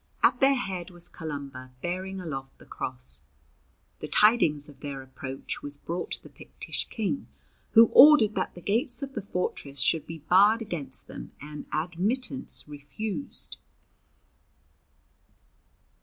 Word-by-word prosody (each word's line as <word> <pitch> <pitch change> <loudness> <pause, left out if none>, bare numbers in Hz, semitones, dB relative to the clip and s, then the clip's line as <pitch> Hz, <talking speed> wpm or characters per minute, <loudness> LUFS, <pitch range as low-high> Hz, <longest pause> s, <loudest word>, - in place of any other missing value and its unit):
At - - +4
their 275 +1 +5
head 190 -8 -3
was 175 -1 -2
Columba, 140 -4 -7
bearing 185 +2 -3
aloft 135 -6 -6
the - - -17
cross. 65 +2 -1 0.8
The - - -5
tidings 165 -10 +4
of 145 -3 -15
their 140 -2 -6
approach 130 0 -6
was 145 0 -2
brought 170 +4 -4
to - - -2
the - - -13
Pictish - - -7
King, 225 +5 -3 0.5
who 230 0 +9
ordered 260 -7 +8
that - - -2
the 175 - -10
gates 240 - +1
of 275 0 -6
the 215 - -3
fortress 180 -7 -3
should 155 +4 +2
be 165 - -6
barred 195 +8 +4
against 175 -10 -3
them - - -10
and 150 0 -9
admittance 195 - 0
refused. 200 - -4
175 Hz, 135 wpm, -27 LUFS, 145-215 Hz, 0.8 s, who